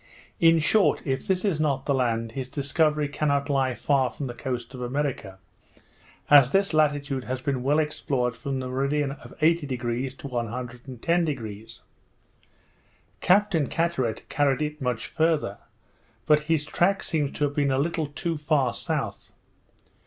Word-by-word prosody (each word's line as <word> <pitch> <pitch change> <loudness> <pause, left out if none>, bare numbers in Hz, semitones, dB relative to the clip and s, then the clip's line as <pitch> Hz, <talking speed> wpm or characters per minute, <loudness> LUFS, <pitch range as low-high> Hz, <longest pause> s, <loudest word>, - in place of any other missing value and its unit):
In 165 0 +6
short, 190 +6 +3
if 135 -2 -2
this 190 +1 +1
is 180 -7 +1
not 140 -3 0
the 140 - +1
land, 115 -3 0
his 130 +1 -5
discovery 150 +2 +1
cannot 140 0 0
lie 135 -2 +1
far 135 -2 +1
from 145 - -6
the 120 - -5
coast 125 -1 -5
of 130 - -8
America, 125 -6 -3 0.9
as 140 -3 +7
this 195 0 +2
latitude 145 -4 +1
has 130 0 -3
been 130 0 -2
well 140 +4 +2
explored 140 -5 -1
from 135 +1 -4
the 130 - -4
meridian 140 +2 0
of 140 - -11
80° 130 -5 0
to - - -7
110°. 125 0 -3 1.4
Captain 185 -6 +3
Carteret 165 -10 -1
carried 145 0 +1
it 150 0 -4
much 125 -3 -1
farther; 155 -10 0 0.7
but 150 0 +5
his 155 -3 +2
track 190 +5 +1
seems 150 -4 0
to - - -2
have 145 -1 +1
been 145 -1 +1
a 130 - +1
little 155 +2 0
too 160 +3 -3
far 150 -4 +1
south. - - -4
140 Hz, 150 wpm, -26 LUFS, 125-155 Hz, 1.4 s, as